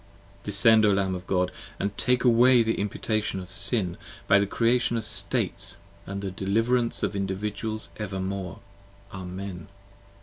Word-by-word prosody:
Descend, 110 +2 +5
O 105 -1 +4
Lamb 95 -1 0
of 90 0 -7
God, 90 -1 0 0.3
& 100 0 -3
take 125 0 +1
away 120 0 +5
the 115 0 -2
imputation 105 0 -2
of 90 -1 -10
Sin 100 -2 0 0.3
By 100 - +5
the 100 - 0
Creation 120 +2 +1
of 110 - -3
States 110 - +3
& - - -28
the 100 0 -5
deliverance 115 +6 0
of 100 - -2
Individuals 105 +3 -3
Evermore. 95 -2 -5 0.6
Amen. 95 0 -7
100 Hz, 140 wpm, -25 LUFS, 95-115 Hz, 0.6 s, Descend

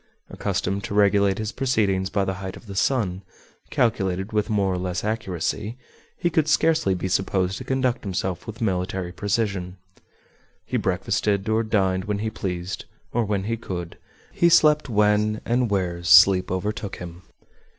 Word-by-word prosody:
Accustomed 100 +2 -2
to 100 - -4
regulate 100 -1 +3
his 110 0 -3
proceedings 100 -8 0
by 100 0 0
the 95 - -1
height 95 -1 -6
of - - -15
the 100 -2 -8
sun, 95 -5 0 0.5
calculated 95 -4 0
with 105 +1 0
more 100 -3 +1
or 90 - -2
less 90 0 -3
accuracy, 105 +1 -2 0.4
he 175 - 0
could 155 -1 +2
scarcely 155 -10 +3
be 95 - -3
supposed 95 0 0
to - - -6
conduct 130 -1 0
himself 95 -3 -3
with 110 +1 -8
military 95 -3 -1
precision. 100 -2 -2 0.9
He - - -4
breakfasted 100 -1 0
or 110 +1 +2
dined 95 -4 0
when 105 -1 -1
he 110 +2 -2
pleased 90 -2 -4 0.3
or 120 -1 +1
when 100 -2 -1
he 115 +3 -2
could; 90 -6 -6 0.4
he 170 - +3
slept 155 -3 +4
when 105 0 +2
and 120 0 +1
where 90 -4 -1
sleep 90 +1 +7
overtook 100 +2 -3
him. 90 0 -9
100 Hz, 160 wpm, -24 LUFS, 95-110 Hz, 0.9 s, sleep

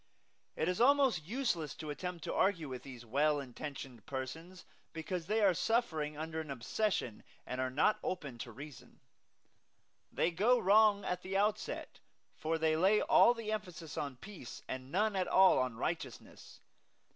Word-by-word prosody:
It 160 - -1
is 180 +4 0
almost 265 - +4
useless 185 - -2
to 155 -2 -6
attempt 180 +2 -5
to - - -3
argue 185 -5 +1
with 130 -2 -6
these 125 -3 -10
well 145 +5 +2
intentioned 130 -3 -7
persons, 160 +8 -6 0.3
because 165 +1 -4
they 215 +2 +1
are 195 -3 +5
suffering 175 -6 0
under 160 +1 -4
an 155 - -9
obsession 135 - -2 0.2
and 125 +1 -3
are 130 - 0
not 150 +11 +2
open 140 -10 -4
to 120 - -6
reason. 140 +3 -11 1.1
They 175 - +1
go 220 +9 +3
wrong 205 0 +4
at 180 0 -2
the 190 +1 -2
outset, 210 +2 -1 0.4
for 160 +1 -1
they 160 0 +2
lay 190 +6 +4
all 240 - +5
the 225 -2 -4
emphasis 180 -7 -5
on 140 -3 -3
peace 170 - -10
and 130 +1 -6
none 210 +3 +1
at 185 -1 0
all 190 -5 +6
on 130 -3 -1
righteousness. - - -5
165 Hz, 160 wpm, -34 LUFS, 140-200 Hz, 1.1 s, all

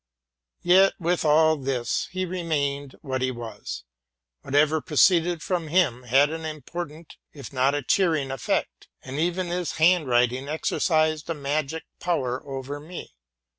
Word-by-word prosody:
Yet, 190 +2 +5
with 175 0 0
all 155 +1 +4
this, 130 -3 -2
he 185 0 -2
remained 145 -6 -2
what 130 -3 -3
he 130 - +1
was: 120 - -7 0.6
whatever 150 +3 +2
proceeded 170 +2 +3
from 175 -4 -2
him 150 -7 +2
had 135 +5 +4
an 160 0 -5
important, 155 +1 -7 0.2
if 140 -3 -10
not 135 +2 +2
a 145 - -2
cheering, 155 -4 +1
effect; 135 -4 -2 0.2
and 135 +2 -5
even 175 +3 0
his 175 -2 -2
handwriting 130 -6 +3
exercised 155 0 0
a 165 - -1
magie 150 +2 -2 0.2
power 130 -8 -1
over 135 +1 -5
me. 160 - -9
155 Hz, 135 wpm, -25 LUFS, 135-170 Hz, 0.6 s, Yet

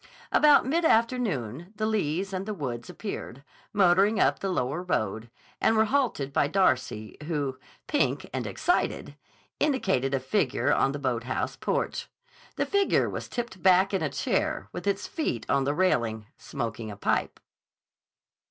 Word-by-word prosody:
About 300 -1 +6
mid 325 +6 +1
afternoon 205 - 0
the 215 +1 -1
Lees 195 -3 -1
and 190 +2 -3
the 215 - -3
Woods 120 -8 -5
appeared, 140 - -6 0.3
motoring 200 +2 +4
up - - +3
the 195 - -2
lower 150 -2 -1
road, 110 - -2 0.3
and 220 - +3
were 220 - +5
halted 220 - 0
by 140 - +3
Darcy, 130 - 0
who, 140 -5 -2 0.3
pink 295 - 0
and - - -2
excited, 355 - -1 0.4
indicated 190 - +1
a - - 0
figure 135 +1 +1
on 135 - +2
the 145 - -4
boathouse 130 -2 -2
porch. - - -2 0.5
The - - 0
figure 400 -1 +2
was - - -5
tipped 235 -7 -5
back 190 +1 +4
in 190 - +1
a 155 - 0
chair, 100 -6 -1
with 175 - -6
its 200 0 0
feet 295 - -3
on 135 - +2
the 145 - +1
railing, 115 - +1
smoking 115 -4 -5
a 100 - -8
pipe. - - -1
175 Hz, 150 wpm, -27 LUFS, 130-215 Hz, 0.5 s, About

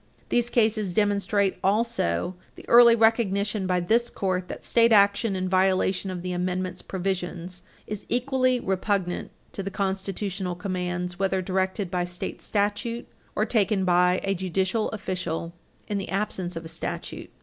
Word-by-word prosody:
These 240 0 +2
cases 215 -5 +1
demonstrate, 205 -1 +1
also, 195 - +1 0.2
the - - -13
early 235 -1 +8
recognition 210 -3 +2
by 180 -1 +2
this 230 +7 +2
Court 185 -2 -2
that - - -7
state 230 0 +4
action 200 0 +4
in 185 0 -1
violation 190 0 +2
of 180 -2 -5
the 180 - -3
Amendment's 180 0 -2
provisions 180 -1 -4 0.2
is 210 -1 -6
equally 255 0 +1
repugnant 190 -2 -1 0.2
to - - -4
the 195 - -3
constitutional 195 -1 -3
commands 180 -1 -3
whether 190 -1 +1
directed 190 0 -1
by 180 -1 0
state 175 0 -6
statute 210 +3 -1 0.3
or 215 - +2
taken 210 -4 +1
by 180 0 +4
a 195 - +1
judicial 190 +4 0
official 180 -5 -4 0.3
in 205 -1 -1
the 195 - -5
absence 190 -3 -2
of 165 0 -6
statute. 165 0 -5
190 Hz, 145 wpm, -26 LUFS, 180-210 Hz, 0.3 s, early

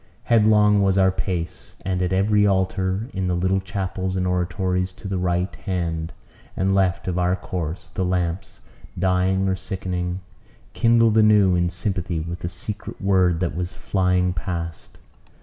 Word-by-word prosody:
Headlong 105 -2 +4
was 95 -1 +2
our 95 -1 +5
pace; 90 -2 -4
and 95 -1 -1
at 90 0 0
every 105 +2 +3
altar, 95 +2 0
in 95 -1 -2
the 90 - 0
little 95 +2 +1
chapels 95 -1 -3
and 95 -1 0
oratories 90 +1 -1
to 95 - -9
the 95 -1 -2
right 90 +1 -1
hand 85 -4 -3 0.5
and 95 +1 +1
left 95 -1 +1
of 90 -1 -1
our 90 +1 +2
course, 90 -2 -5
the 95 - -2
lamps, 90 +1 -2 0.4
dying 95 +1 +1
or 95 - +1
sickening, 90 -1 -3 0.5
kindled 115 -2 +4
anew 105 -3 +5
in 85 0 +1
sympathy 90 -2 -2
with 85 +2 -5
the 85 - -4
secret 105 +3 -6
word 95 -4 +2
that 85 -4 -1
was 90 0 -3
flying 90 -1 +1
past. 85 -1 -5
95 Hz, 155 wpm, -23 LUFS, 90-95 Hz, 0.5 s, our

